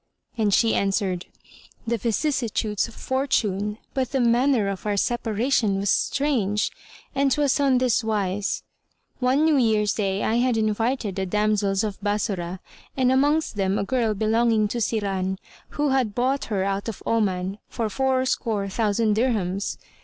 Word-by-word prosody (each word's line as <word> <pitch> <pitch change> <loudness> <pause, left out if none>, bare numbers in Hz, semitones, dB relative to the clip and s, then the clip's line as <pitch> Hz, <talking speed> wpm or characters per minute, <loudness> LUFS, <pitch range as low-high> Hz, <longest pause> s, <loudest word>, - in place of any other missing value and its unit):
and 215 -3 +1
she 225 +3 +3
answered, 195 -2 0 0.6
"The 235 +1 0
vicissitudes 230 -3 0
of 230 - -14
fortune, 210 -6 -1 0.2
but 260 -3 -1
the 270 - +2
manner 240 -1 +3
of 195 +1 -4
our 205 -1 0
separation 225 -1 +1
was 200 0 +1
strange; 225 -8 +1 0.4
and 275 -1 +2
'twas 285 0 +2
on 275 -2 +3
this 250 -2 +2
wise. 205 -2 -1 0.6
One 265 +4 +2
New 315 -2 +4
Year's 215 -4 +2
day 195 -1 -1
I 225 - +1
had 245 -1 +2
invited 220 -1 0
the 190 0 -1
damsels 210 0 +1
of 205 -2 -4
Bassorah 195 -3 -2 0.4
and 255 -1 +3
amongst 290 -1 +2
them 195 0 +1
a - - 0
girl 225 -1 0
belonging 220 +1 +2
to 240 - -2
Siran, 195 -4 -1 0.4
who 295 0 +2
had 255 -6 +1
bought 260 +3 0
her 200 -4 -1
out 195 +2 -2
of 220 - -8
Oman 195 -3 0
for 230 - -2
four 260 +3 +1
score 220 -6 -1
thousand 215 +1 +1
dirhams. 205 -5 -1
220 Hz, 155 wpm, -24 LUFS, 200-255 Hz, 0.6 s, New